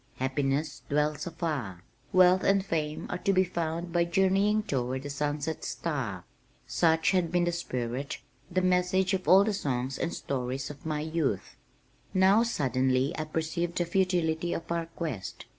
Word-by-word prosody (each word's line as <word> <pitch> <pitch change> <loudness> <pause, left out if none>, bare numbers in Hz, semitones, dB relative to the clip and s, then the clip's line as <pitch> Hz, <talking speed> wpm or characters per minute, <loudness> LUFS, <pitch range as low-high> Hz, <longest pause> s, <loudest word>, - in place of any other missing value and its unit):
Happiness 135 +3 -1
dwells 150 +2 0
afar. 145 - -3 0.3
Wealth 185 0 +5
and 195 -1 +3
fame 155 -4 -2
are 180 - -2
to 195 - +1
be 185 -1 +4
found 170 -1 -3
by 175 -1 +3
journeying 195 +4 +2
toward 130 -4 -2
the 145 - -5
sunset 145 +2 -2
star!" 125 - -3 0.4
Such 160 -1 +2
had 180 -4 +1
been 175 0 +2
the 175 - +1
spirit, 130 -4 -3 0.3
the 185 +1 0
message 185 +1 +2
of 185 -1 -2
all 190 +2 +8
the 215 0 0
songs 130 -6 -2
and 170 - -1
stories 135 +1 -3
of 145 +3 -10
my 150 -1 -1
youth. 155 - -2 0.6
Now 190 +4 +5
suddenly 130 - +1
I 155 - -3
perceived 165 +2 -2
the 175 - +1
futility 175 -2 +1
of 165 - -5
our 170 -1 -1
quest. 155 - -5
160 Hz, 160 wpm, -29 LUFS, 140-180 Hz, 0.6 s, all